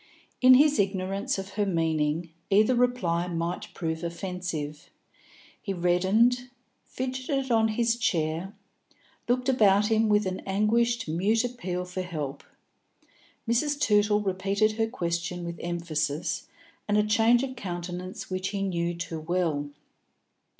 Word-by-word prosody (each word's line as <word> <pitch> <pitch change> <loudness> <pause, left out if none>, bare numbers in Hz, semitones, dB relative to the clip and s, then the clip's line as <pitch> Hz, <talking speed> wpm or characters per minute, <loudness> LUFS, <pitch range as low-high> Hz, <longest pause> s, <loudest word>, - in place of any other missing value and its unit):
In 255 0 +9
his 295 +2 +5
ignorance 195 0 -1
of 195 0 -5
her 205 +1 -1
meaning, 160 -2 0 0.2
either 215 +5 +4
reply 240 -9 +1
might 170 0 -3
prove 160 -1 -3
offensive. 170 -4 -5 0.7
He 195 - -3
reddened, 200 +8 +2 0.4
fidgeted 260 +1 -3
on 225 -1 +4
his 230 +1 +1
chair, 170 -1 -1 0.7
looked 250 +1 +1
about 210 -4 +4
him 220 0 +3
with 210 0 +3
an 185 0 -2
anguished 230 +4 +1
mute 200 +9 +1
appeal 185 -8 -3
for 180 +1 -4
help. 155 -6 -5 1.0
Mrs. 285 +5 +1
Tootle 210 -3 +3
repeated 200 +2 +1
her 225 +1 0
question 175 -5 -3
with 170 0 -6
emphasis 160 -3 -2 0.4
and 210 0 +2
a 210 - +4
change 225 +3 +4
of 260 -1 -4
countenance 180 -3 -6
which 185 0 -3
he 195 0 -2
knew 175 -2 -1
too 170 -1 -5
well. 160 -3 -1
195 Hz, 130 wpm, -27 LUFS, 170-225 Hz, 1.0 s, In